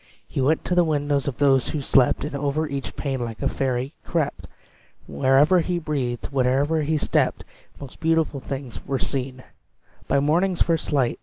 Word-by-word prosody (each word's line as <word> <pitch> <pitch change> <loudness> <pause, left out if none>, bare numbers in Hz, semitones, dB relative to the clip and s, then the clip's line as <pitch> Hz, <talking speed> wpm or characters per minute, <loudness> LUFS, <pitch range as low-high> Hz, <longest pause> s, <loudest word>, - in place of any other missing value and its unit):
He - - -2
went 150 +5 +1
to - - -1
the 175 0 +5
windows 145 -3 0
of 135 - -3
those 135 -3 +3
who 150 - -2
slept, 130 -1 +3
And 150 - -5
over 145 +2 -1
each 140 -2 -5
pane, 135 -4 -2
like 115 -2 -6
a - - +2
fairy 130 +1 -2
crept; 155 -4 -2 0.6
Wherever 135 - +4
he 175 +1 -1
breathed 140 -7 -3
wherever 140 +4 +2
he 155 +1 0
stepped - - 0 0.4
Most 140 -2 -10
beautiful 160 -3 +1
things 130 -1 -7
were 135 - 0
seen 130 -1 -3 0.6
By 140 - +2
morning's 170 +6 +2
first 165 -2 -1
light! 135 -5 +1
140 Hz, 170 wpm, -23 LUFS, 130-155 Hz, 0.6 s, the